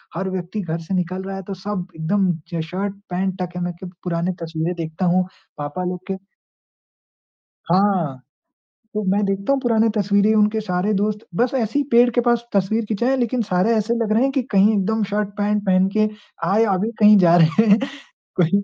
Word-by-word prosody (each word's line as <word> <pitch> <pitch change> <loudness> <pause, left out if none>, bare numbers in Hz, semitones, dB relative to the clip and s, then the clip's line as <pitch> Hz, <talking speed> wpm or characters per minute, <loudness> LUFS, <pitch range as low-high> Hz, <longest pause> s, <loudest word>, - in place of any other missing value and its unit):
हर 190 +2 -2
व्यक्ति 185 +3 -4
घर 165 -2 -3
से 165 +4 -6
निकल 185 +1 -2
रहा 195 0 -5
है 195 - -6
तो 195 - -4
सब 190 -1 -4
एकदम 185 +4 +1 0.2
ज 165 - -1
शर्ट 195 +2 -3
पैंट 185 +1 -2
टक 180 -1 -5
है। 180 - -3
मैं 175 0 -3
क्य 185 - -7 0.2
पुरानी 175 0 -1
तस्वीरें 165 +1 -2
देखता 165 +2 -3
हूँ। 180 +1 +2 0.3
पापा 145 +5 -4
लोग 180 0 -3
के 190 - -2 1.5
हाँ। 180 -8 +2 0.7
तो 215 - -1
मैं 205 +1 +2
देखता 195 +5 0
हूँ 275 - +1
पुरानी 230 -3 +2
तस्वीरें 205 +1 +3
उनके 215 +1 +2
सारे 185 +1 -1
दोस्त, 210 +1 0 0.2
बस 240 +7 +2
ऐसे 235 +1 0
ही 285 - +1
पेड़ 240 +1 +6
के 245 - +4
पास 240 -1 +1
तस्वीर 205 +3 +1
खिचाया। 240 +5 +1
लेकिन 245 -1 0
सारे 190 +2 +1
ऐसे 220 +2 0
लग 215 -1 -1
रहे 225 +3 +3
हैं 270 - +2
कि 270 - 0
कहीं 205 +1 +4
एकदम 220 +3 0
शर्ट 210 0 0
पैंट 210 0 0
पहन 185 0 +3
के 215 0 +3 0.4
आए, 210 +4 +4
अभी 200 +5 -1
कहीं 210 -1 +7
जा 175 -2 +5
रहे 165 +6 +4
हैं। 205 - +7 0.6
कोई 170 -3 +3
195 Hz, 200 wpm, -21 LUFS, 180-215 Hz, 1.5 s, कहीं